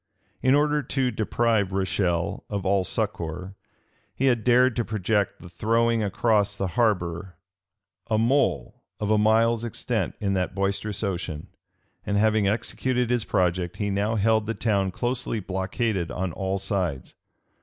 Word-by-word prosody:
In 130 Hz, +2 st, +4 dB
order 150 Hz, 0 st, +2 dB
to 130 Hz, -1 st, -1 dB
deprive 110 Hz, -2 st, +1 dB
Rochelle 90 Hz, -3 st, -1 dB
of 100 Hz, -2 st, -3 dB
all 95 Hz, 0 st, +2 dB
succor, 90 Hz, +1 st, -3 dB, 0.6 s
he 135 Hz, -, 0 dB
had 120 Hz, -4 st, +2 dB
dared 125 Hz, 0 st, +4 dB
to 120 Hz, -, +2 dB
project 105 Hz, -2 st, -1 dB
the -, -, -11 dB
throwing 115 Hz, +5 st, +1 dB
across 105 Hz, 0 st, +1 dB
the 95 Hz, -1 st, -2 dB
harbor 90 Hz, -5 st, 0 dB, 0.7 s
a 110 Hz, -, +2 dB
mole 130 Hz, +5 st, +1 dB, 0.2 s
of 105 Hz, 0 st, -1 dB
a 105 Hz, -, +4 dB
mile's 115 Hz, +2 st, +3 dB
extent 115 Hz, -, -2 dB
in 100 Hz, -2 st, 0 dB
that 95 Hz, -1 st, -1 dB
boisterous 100 Hz, +1 st, -2 dB
ocean; 85 Hz, -6 st, -3 dB, 0.5 s
and 100 Hz, -, -1 dB
having 110 Hz, -1 st, +3 dB
executed 125 Hz, +3 st, 0 dB
his 120 Hz, -2 st, +1 dB
project, 90 Hz, -1 st, 0 dB
he 100 Hz, -1 st, -1 dB
now 105 Hz, +3 st, 0 dB
held 110 Hz, 0 st, +2 dB
the 115 Hz, -, -2 dB
town 100 Hz, -3 st, +1 dB
closely 120 Hz, +3 st, -2 dB
blockaded 95 Hz, 0 st, -2 dB
on 95 Hz, -1 st, -3 dB
all 95 Hz, +3 st, -2 dB
sides. 90 Hz, -9 st, -2 dB
105 Hz, 145 wpm, -25 LUFS, 95-115 Hz, 0.7 s, In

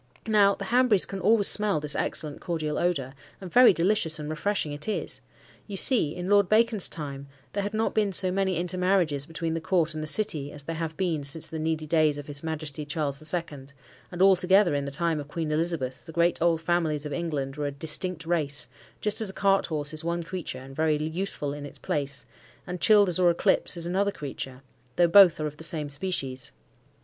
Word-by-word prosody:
Now 205 Hz, -3 st, +3 dB
the 200 Hz, -, -7 dB
Hanburys 240 Hz, -3 st, +3 dB
can 195 Hz, -, -7 dB
always 205 Hz, +2 st, +3 dB
smell 210 Hz, -6 st, +4 dB
this 150 Hz, 0 st, +2 dB
excellent 150 Hz, -2 st, -3 dB
cordial 155 Hz, -3 st, -3 dB
odour, 140 Hz, -7 st, -1 dB, 0.3 s
and 185 Hz, -3 st, -10 dB
very 250 Hz, 0 st, +7 dB
delicious 170 Hz, -2 st, +1 dB
and 150 Hz, 0 st, -6 dB
refreshing 155 Hz, 0 st, -2 dB
it 145 Hz, +5 st, -6 dB
is. 215 Hz, -, -4 dB, 0.5 s
You 200 Hz, -2 st, -6 dB
see, 185 Hz, -, +3 dB
in 180 Hz, 0 st, -5 dB
Lord 200 Hz, -2 st, +3 dB
Bacon's 220 Hz, -2 st, +3 dB
time, 140 Hz, -3 st, -6 dB, 0.3 s
there 200 Hz, -, -1 dB
had 205 Hz, +2 st, -4 dB
not 220 Hz, +1 st, -1 dB
been 210 Hz, -2 st, +1 dB
so 185 Hz, 0 st, +6 dB
many 190 Hz, -1 st, 0 dB
intermarriages 180 Hz, -4 st, 0 dB
between 165 Hz, 0 st, -4 dB
the 165 Hz, -, -3 dB
court 170 Hz, -2 st, 0 dB
and 155 Hz, -, -5 dB
the 155 Hz, -, -3 dB
city 155 Hz, -6 st, +1 dB
as 145 Hz, -1 st, -6 dB
there 165 Hz, +2 st, -5 dB
have 160 Hz, -1 st, -5 dB
been 170 Hz, -6 st, -1 dB
since 140 Hz, +3 st, +3 dB
the 160 Hz, -, -6 dB
needy 160 Hz, 0 st, -2 dB
days 155 Hz, -2 st, +2 dB
of 145 Hz, -, -7 dB
his 145 Hz, -1 st, -3 dB
Majesty 155 Hz, -2 st, -4 dB
Charles 145 Hz, -2 st, -3 dB
the 155 Hz, -, -9 dB
Second; 150 Hz, -5 st, -3 dB, 0.4 s
and 180 Hz, +1 st, 0 dB
altogether 190 Hz, -1 st, +4 dB
in 140 Hz, -1 st, -1 dB
the -, -, -4 dB
time 160 Hz, +2 st, -1 dB
of 145 Hz, -, -7 dB
Queen 155 Hz, +1 st, -4 dB
Elizabeth, 150 Hz, -5 st, -1 dB
the -, -, -8 dB
great, 170 Hz, +1 st, +1 dB
old 165 Hz, -1 st, +2 dB
families 160 Hz, -3 st, -1 dB
of 150 Hz, -, -5 dB
England 145 Hz, -6 st, -3 dB
were 150 Hz, -1 st, -3 dB
a -, -, -3 dB
distinct 165 Hz, +4 st, -2 dB
race, 155 Hz, -4 st, 0 dB, 0.4 s
just 210 Hz, +1 st, 0 dB
as 215 Hz, -, 0 dB
a -, -, -5 dB
cart 195 Hz, 0 st, +1 dB
horse 150 Hz, -3 st, -3 dB
is 155 Hz, +1 st, -2 dB
one 170 Hz, +1 st, -2 dB
creature, 170 Hz, -5 st, -6 dB
and 135 Hz, +1 st, -12 dB
very 155 Hz, 0 st, +1 dB
useful 155 Hz, -1 st, -2 dB
in 145 Hz, 0 st, -8 dB
its 145 Hz, -, -9 dB
place, 140 Hz, -1 st, -3 dB, 0.4 s
and 180 Hz, 0 st, -6 dB
Childers 205 Hz, -5 st, +4 dB
or 180 Hz, -1 st, +4 dB
Eclipse 175 Hz, +1 st, +1 dB
is 170 Hz, -, -3 dB
another 195 Hz, +3 st, 0 dB
creature, 135 Hz, -5 st, -8 dB, 0.3 s
though 175 Hz, -, +4 dB
both 180 Hz, -1 st, +6 dB
are 155 Hz, -, -2 dB
of 150 Hz, 0 st, -6 dB
the 160 Hz, -, -8 dB
same 155 Hz, -4 st, 0 dB
species. 140 Hz, -5 st, -3 dB
165 Hz, 215 wpm, -26 LUFS, 150-190 Hz, 0.5 s, very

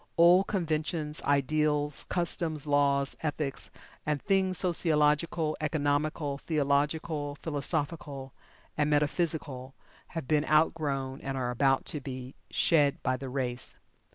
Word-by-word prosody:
Old 175 Hz, +3 st, +6 dB
conventions, 155 Hz, -4 st, -2 dB
ideals, 150 Hz, +1 st, +1 dB
customs, 165 Hz, -4 st, -1 dB
laws, 140 Hz, -1 st, +2 dB
ethics, 150 Hz, -2 st, -3 dB, 0.3 s
and 150 Hz, -1 st, 0 dB
things 190 Hz, +2 st, +1 dB
sociological, 155 Hz, -2 st, +2 dB
economical, 145 Hz, -1 st, 0 dB
theological, 145 Hz, 0 st, 0 dB
philosophical, 145 Hz, -2 st, -3 dB, 0.4 s
and 150 Hz, 0 st, +1 dB
metaphysical 145 Hz, -3 st, 0 dB, 0.4 s
have 155 Hz, -6 st, -4 dB
been 150 Hz, 0 st, +3 dB
outgrown, 145 Hz, -4 st, +1 dB
and 135 Hz, 0 st, -3 dB
are 125 Hz, -1 st, -1 dB
about 135 Hz, +2 st, +2 dB
to 150 Hz, -, -3 dB
be 130 Hz, 0 st, -7 dB, 0.2 s
"shed" 145 Hz, -4 st, +3 dB
by 130 Hz, -, +1 dB
the 130 Hz, +1 st, -6 dB
race. 125 Hz, -2 st, -3 dB
150 Hz, 110 wpm, -29 LUFS, 140-160 Hz, 0.4 s, Old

